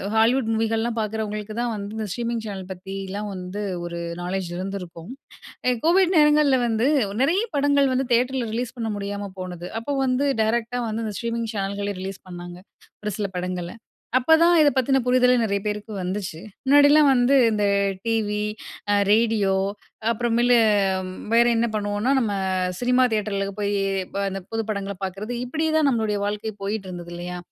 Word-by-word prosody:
Hollywood 225 Hz, +1 st, +3 dB
மூவிகள்லாம் 225 Hz, +1 st, 0 dB
பார்க்குறவங்களுக்கு 215 Hz, 0 st, -4 dB
தான் 240 Hz, -2 st, -1 dB
வந்து 200 Hz, 0 st, -6 dB
இந்த 215 Hz, -, -3 dB
ஸ்ட்ரீமிங் 235 Hz, -1 st, -3 dB
சேனல் 190 Hz, -3 st, -6 dB
பத்திலாம் 195 Hz, +2 st, -6 dB
வந்து 185 Hz, +3 st, -5 dB, 0.2 s
ஒரு 170 Hz, 0 st, -5 dB, 0.2 s
நாலேஜ் 185 Hz, -1 st, -3 dB
இருந்திருக்கும். 180 Hz, -1 st, -6 dB, 0.6 s
எ -, -, +3 dB
கோவிட் 365 Hz, +2 st, +4 dB
நேரங்கள்ல 300 Hz, -3 st, +5 dB
வந்து 230 Hz, +3 st, +1 dB, 0.3 s
நெறைய 360 Hz, +11 st, +2 dB
படங்கள் 280 Hz, -1 st, +3 dB
வந்து, 260 Hz, 0 st, 0 dB
தியேட்டரில 250 Hz, 0 st, +1 dB
ரிலீஸ் 245 Hz, +1 st, -3 dB
பண்ண 225 Hz, -1 st, -2 dB
முடியாம 200 Hz, 0 st, -4 dB
போனது. 180 Hz, -1 st, -6 dB
அப்போ 285 Hz, +5 st, -4 dB
வந்து 255 Hz, +2 st, +1 dB, 0.2 s
டைரக்ட்டா 235 Hz, +2 st, 0 dB
வந்து 220 Hz, +1 st, -3 dB
இந்த 210 Hz, -, -4 dB
ஸ்ட்ரீமிங் 230 Hz, -1 st, -2 dB
சேனல்களே 200 Hz, 0 st, -2 dB
ரிலீஸ் 195 Hz, 0 st, -6 dB
பண்ணாங்க, 175 Hz, 0 st, -8 dB, 0.5 s
ஒரு 210 Hz, -, -1 dB
சில 205 Hz, -, 0 dB
படங்கள. 180 Hz, -1 st, -3 dB, 0.5 s
அப்பதான் 320 Hz, +6 st, +5 dB
இத 295 Hz, -, +6 dB
பத்தின 270 Hz, +1 st, +3 dB
புரிதலே 250 Hz, 0 st, +4 dB
நெறைய 200 Hz, -2 st, 0 dB
பேருக்கு 210 Hz, +1 st, -3 dB
வந்துச்சு. 180 Hz, -3 st, -4 dB, 0.2 s
முன்னாடிலாம் 290 Hz, +2 st, +6 dB
வந்து 250 Hz, +1 st, +3 dB, 0.2 s
இந்த 210 Hz, -1 st, 0 dB, 0.4 s
டிவி, 215 Hz, -2 st, 0 dB, 0.5 s
அ -, -, +4 dB, 0.2 s
ரேடியோ 215 Hz, -3 st, +3 dB, 0.6 s
அப்புறமேலு 240 Hz, +1 st, +2 dB, 0.8 s
வேற 235 Hz, +1 st, +6 dB
என்ன 235 Hz, +1 st, +2 dB
பண்ணுவோனா 205 Hz, +3 st, -1 dB
நம்ம 225 Hz, -5 st, 0 dB, 0.5 s
சினிமா 250 Hz, +1 st, +3 dB
தியேட்டர்ல 205 Hz, -2 st, -1 dB
போய் 205 Hz, 0 st, 0 dB, 0.6 s
இந்த 195 Hz, -, -4 dB
புது 225 Hz, 0 st, -1 dB
படங்கள 200 Hz, -1 st, -3 dB
பார்க்கறது. 195 Hz, +5 st, -5 dB
இப்படியே 315 Hz, +5 st, -1 dB
தான் 310 Hz, -3 st, +4 dB
நம்மளுடைய 220 Hz, -4 st, 0 dB
வாழ்க்கை 210 Hz, +1 st, -3 dB
போயிட்டுருந்தது 185 Hz, -4 st, -5 dB
இல்லையா? 180 Hz, +1 st, -5 dB
220 Hz, 150 wpm, -23 LUFS, 200-245 Hz, 0.8 s, இத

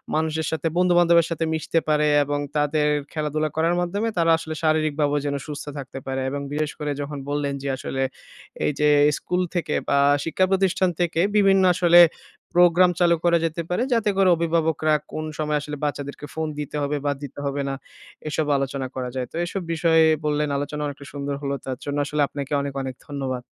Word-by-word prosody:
মানুষের 160 Hz, 0 st, 0 dB
সাথে 160 Hz, +1 st, -1 dB
বন্ধুবান্ধবের 175 Hz, -2 st, +4 dB
সাথে 165 Hz, -1 st, -1 dB
মিশতে 160 Hz, +1 st, 0 dB
পারে, 150 Hz, 0 st, +2 dB, 0.2 s
এবং 145 Hz, +1 st, -2 dB, 0.2 s
তাদের 150 Hz, 0 st, +1 dB, 0.3 s
খেলাধুলা 155 Hz, 0 st, -1 dB
করার 165 Hz, +2 st, +2 dB
মাধ্যমে 200 Hz, +6 st, -1 dB
তারা 165 Hz, -1 st, +3 dB
আসলে 160 Hz, -1 st, -6 dB
শারীরিকভাবেও 155 Hz, -2 st, +1 dB
যেন 140 Hz, 0 st, -1 dB
সুস্থ 145 Hz, -1 st, -6 dB
থাকতে 135 Hz, -1 st, -7 dB
পারে। 135 Hz, 0 st, -2 dB
এবং 140 Hz, +1 st, -4 dB
বিশেষ 150 Hz, 0 st, -1 dB
করে 150 Hz, -1 st, -2 dB
যখন 145 Hz, +1 st, -5 dB
বললেন 145 Hz, -1 st, -1 dB
যে -, -, -3 dB
আসলে 135 Hz, 0 st, -4 dB, 0.6 s
এই -, -, +2 dB
যে, 150 Hz, 0 st, +4 dB, 0.3 s
স্কুল 180 Hz, 0 st, -1 dB, 0.2 s
থেকে 160 Hz, -3 st, -1 dB
বা 140 Hz, -, +3 dB, 0.3 s
শিক্ষা 185 Hz, +3 st, +2 dB
প্রতিষ্ঠান 190 Hz, -1 st, +2 dB
থেকে 170 Hz, -1 st, +1 dB, 0.2 s
বিভিন্ন 195 Hz, -1 st, +5 dB
আসলে 175 Hz, 0 st, +5 dB, 0.5 s
প্রোগ্রাম 175 Hz, +1 st, +5 dB
চালু 170 Hz, -1 st, +4 dB
করা 170 Hz, -1 st, +4 dB
যেতে 165 Hz, +1 st, -2 dB
পারে। 180 Hz, +5 st, 0 dB
যাতে 225 Hz, -3 st, +2 dB
করে 195 Hz, -1 st, +5 dB
অভিভাবকরা 160 Hz, -2 st, +1 dB, 0.2 s
কোন 155 Hz, -, -4 dB
সময় 150 Hz, -1 st, 0 dB
আসলে 150 Hz, 0 st, -6 dB
বাচ্চাদেরকে 145 Hz, 0 st, -4 dB
ফোন 160 Hz, 0 st, -2 dB
দিতে 150 Hz, 0 st, -5 dB
হবে 145 Hz, +1 st, -1 dB
বা 145 Hz, -, +2 dB
দিতে 145 Hz, -, -8 dB
হবে 140 Hz, 0 st, -1 dB
না? 135 Hz, -, -2 dB, 0.5 s
এসব 155 Hz, 0 st, -1 dB
আলোচনা 135 Hz, -1 st, -2 dB
করা 125 Hz, -1 st, -3 dB
যায়। 125 Hz, -1 st, -2 dB
তো -, -, -11 dB
এসব 190 Hz, +2 st, -4 dB
বিষয়ে 160 Hz, 0 st, +4 dB, 0.2 s
বললেন 150 Hz, 0 st, 0 dB
আলোচনা 145 Hz, +1 st, -4 dB
অনেকটা 145 Hz, 0 st, -6 dB
সুন্দর 140 Hz, 0 st, -3 dB
হলো। 140 Hz, -1 st, -2 dB
তার 130 Hz, -1 st, -4 dB
জন্য 145 Hz, 0 st, -2 dB
আসলে 150 Hz, 0 st, -1 dB
আপনাকে 140 Hz, 0 st, -6 dB
অনেক, 140 Hz, -1 st, -4 dB
অনেক 130 Hz, -1 st, -5 dB
ধন্যবাদ। 135 Hz, -3 st, -4 dB
150 Hz, 185 wpm, -23 LUFS, 145-170 Hz, 0.6 s, বিভিন্ন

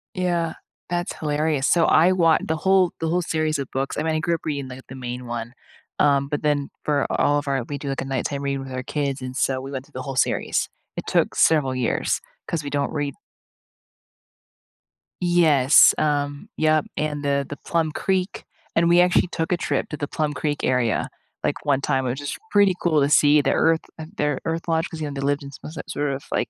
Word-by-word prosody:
Yeah. 175 Hz, -3 st, 0 dB, 0.4 s
That's 175 Hz, +2 st, -2 dB
hilarious. 150 Hz, -2 st, 0 dB
So, 170 Hz, -2 st, +4 dB
I 175 Hz, +4 st, +5 dB
wa 165 Hz, -3 st, +4 dB
the 160 Hz, -, -1 dB
whole 190 Hz, 0 st, +3 dB
the 165 Hz, -, -1 dB
whole 180 Hz, +2 st, +1 dB
series 155 Hz, -2 st, 0 dB
of 135 Hz, -, -3 dB
books 135 Hz, +1 st, -2 dB
I 150 Hz, -, 0 dB
mean, 160 Hz, -1 st, 0 dB
I -, -, +1 dB
grew 170 Hz, +1 st, 0 dB
up -, -, -9 dB
reading, 140 Hz, -3 st, -2 dB
like, 130 Hz, +1 st, -9 dB
the 130 Hz, -, -9 dB
main 125 Hz, -1 st, -6 dB
one. 120 Hz, 0 st, -5 dB, 0.5 s
Um, 140 Hz, -1 st, +3 dB
but 145 Hz, -, -2 dB
then 145 Hz, -2 st, +1 dB
for 145 Hz, -2 st, +1 dB
all 145 Hz, 0 st, +2 dB
of 145 Hz, -, -8 dB
our 135 Hz, -3 st, 0 dB
we 145 Hz, -, -3 dB
do, 140 Hz, 0 st, -5 dB
like, 135 Hz, -, -2 dB
a -, -, -4 dB
nighttime 135 Hz, +1 st, -2 dB
reading 140 Hz, -1 st, -2 dB
with 135 Hz, -, -9 dB
our 130 Hz, 0 st, -3 dB
kids, 140 Hz, -1 st, -2 dB
and 130 Hz, 0 st, -6 dB
so 130 Hz, -1 st, +1 dB
we 135 Hz, +1 st, -7 dB
went 130 Hz, 0 st, -5 dB
through -, -, -26 dB
the 130 Hz, -, -4 dB
whole 135 Hz, -2 st, -5 dB
series. -, -, 0 dB, 0.3 s
It -, -, -5 dB
took -, -, +2 dB
several 145 Hz, -5 st, +3 dB
years 125 Hz, -2 st, 0 dB, 0.3 s
'cause 160 Hz, -3 st, -2 dB
we 145 Hz, -, -4 dB
don't 145 Hz, +1 st, -1 dB
read 145 Hz, -2 st, -2 dB, 2.1 s
Yes, 155 Hz, -6 st, +6 dB
um 145 Hz, +5 st, -1 dB
Yep, 155 Hz, -1 st, +3 dB
and, 150 Hz, -1 st, -2 dB
the 140 Hz, -1 st, +1 dB
the 145 Hz, -, -7 dB
Plum 165 Hz, -2 st, -1 dB
Creek 190 Hz, +3 st, -1 dB, 0.3 s
and 170 Hz, 0 st, +3 dB
we 175 Hz, +1 st, +6 dB
actually 180 Hz, 0 st, +4 dB
took 165 Hz, +1 st, -3 dB
a -, -, +1 dB
trip -, -, -1 dB
to 150 Hz, -, -5 dB
the 145 Hz, -, -3 dB
Plum 150 Hz, -2 st, -1 dB
Creek 145 Hz, +2 st, -2 dB
area, 125 Hz, -4 st, +1 dB, 0.4 s
like, -, -, -2 dB
one 140 Hz, -2 st, +2 dB
time, 135 Hz, -1 st, 0 dB
which 130 Hz, +2 st, -2 dB
is 145 Hz, -, -4 dB, 0.2 s
pretty 200 Hz, -2 st, +5 dB
cool 160 Hz, -4 st, +3 dB
to 140 Hz, -, +3 dB
see. 150 Hz, 0 st, +6 dB
The 135 Hz, -, +1 dB
earth 160 Hz, 0 st, +3 dB, 0.4 s
their 150 Hz, -1 st, 0 dB
earth 165 Hz, +1 st, -3 dB
lodge, 165 Hz, +1 st, 0 dB
'cause, 160 Hz, -, -8 dB
you 150 Hz, -, -3 dB
know, 145 Hz, -, -5 dB
they 140 Hz, -, -4 dB
lived 145 Hz, +1 st, 0 dB
in 140 Hz, -, -8 dB
some 145 Hz, -, -10 dB
s 160 Hz, -, -11 dB
sort 145 Hz, -1 st, -2 dB
of, 135 Hz, +1 st, -5 dB
like, -, -, 0 dB
145 Hz, 225 wpm, -23 LUFS, 135-160 Hz, 2.1 s, Yes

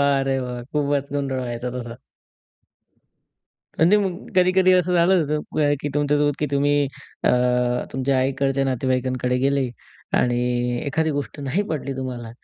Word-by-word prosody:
वाह 140 Hz, -1 st, +3 dB
रे 135 Hz, -, +1 dB
वाह! 125 Hz, -1 st, -5 dB
खूपचं 145 Hz, -1 st, -1 dB
गोंधळ 135 Hz, -2 st, -1 dB
व्हायचा 120 Hz, 0 st, -4 dB
तसा. 120 Hz, -1 st, -6 dB, 1.8 s
म्हणजे 175 Hz, +6 st, +5 dB
मग 190 Hz, -2 st, -3 dB
कधी-कधी 185 Hz, 0 st, +5 dB
असं 180 Hz, 0 st, +3 dB
झालं 175 Hz, +1 st, +4 dB, 0.6 s
की 145 Hz, -, -2 dB
तुमच्यासोबत, 145 Hz, 0 st, +2 dB
की 150 Hz, -, 0 dB
तुम्ही 145 Hz, +1 st, +2 dB, 0.4 s
अ, -, -, +4 dB, 0.6 s
तुमच्या 135 Hz, +1 st, +1 dB
आईकडंच्या 135 Hz, +1 st, +1 dB
नातेवाईकांकडे 130 Hz, -1 st, 0 dB
गेले 135 Hz, 0 st, +1 dB, 0.5 s
आणि 120 Hz, 0 st, 0 dB
एखादी 160 Hz, +3 st, 0 dB
गोष्ट 145 Hz, 0 st, -4 dB
नाही 140 Hz, +8 st, 0 dB
पटली 145 Hz, -3 st, -3 dB
तुम्हाला 125 Hz, -3 st, -5 dB
140 Hz, 130 wpm, -22 LUFS, 130-150 Hz, 1.8 s, म्हणजे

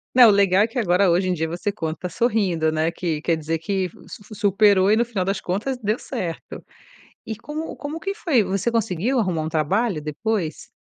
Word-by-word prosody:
Não, 245 Hz, -3 st, +9 dB
legal 200 Hz, -1 st, +4 dB
é -, -, +1 dB
que 235 Hz, +2 st, -4 dB
agora 185 Hz, -2 st, +3 dB
hoje 185 Hz, +2 st, +2 dB
em -, -, +2 dB
dia 160 Hz, -2 st, -1 dB
você 175 Hz, +5 st, -3 dB
conta 165 Hz, -1 st, -4 dB
sorrindo, 185 Hz, -7 st, +1 dB
né, 160 Hz, +1 st, 0 dB
que 165 Hz, -3 st, -3 dB
quer 165 Hz, -1 st, +1 dB
dizer 160 Hz, +1 st, -2 dB
que 190 Hz, +2 st, -1 dB, 0.2 s
su 210 Hz, -, -10 dB
su 215 Hz, +1 st, -12 dB
superou 200 Hz, -1 st, +4 dB
e 215 Hz, -, +4 dB
no 235 Hz, -, +2 dB
final 220 Hz, -6 st, -2 dB
das 195 Hz, +1 st, -1 dB
contas 215 Hz, +9 st, -2 dB
deu 215 Hz, 0 st, -1 dB
certo. 180 Hz, -11 st, -6 dB, 0.6 s
E 220 Hz, -, -4 dB
como 305 Hz, +7 st, -6 dB
como 300 Hz, +3 st, -6 dB
que 390 Hz, +3 st, -3 dB
foi? 305 Hz, -, +2 dB
Você 195 Hz, +4 st, -1 dB
conseguiu 225 Hz, +2 st, 0 dB
arrumar 180 Hz, -7 st, 0 dB
um 155 Hz, -, -3 dB
trabalho 170 Hz, -, 0 dB
depois? 160 Hz, +2 st, -3 dB
195 Hz, 205 wpm, -22 LUFS, 170-225 Hz, 0.6 s, Não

